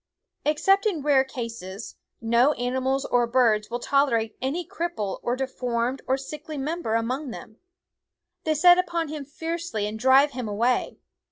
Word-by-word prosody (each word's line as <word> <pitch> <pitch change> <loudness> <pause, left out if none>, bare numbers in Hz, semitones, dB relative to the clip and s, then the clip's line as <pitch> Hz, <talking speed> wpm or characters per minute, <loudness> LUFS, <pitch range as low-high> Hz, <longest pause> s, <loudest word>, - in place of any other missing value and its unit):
Except 390 +8 +3
in 335 -9 -2
rare 280 -3 +4
cases, 230 -6 -7 0.2
no 235 +5 +3
animals 260 +2 -1
or 240 -1 +2
birds 230 -4 +2
will 240 - -2
tolerate 240 -5 +1
any 305 +7 -2
cripple 330 - -3
or 240 - -1
deformed 250 -1 -2
or 265 - +2
sickly 300 +3 -7
member 290 -4 -2
among 255 +5 -1
them. 220 -1 -10 0.9
They 310 -1 +1
set 355 +4 +7
upon 340 -3 -1
him 300 -2 -6
fiercely 325 -6 -4
and 215 +1 -5
drive 265 +4 +5
him 250 -3 -5
away. 235 +4 0
265 Hz, 150 wpm, -25 LUFS, 235-305 Hz, 0.9 s, set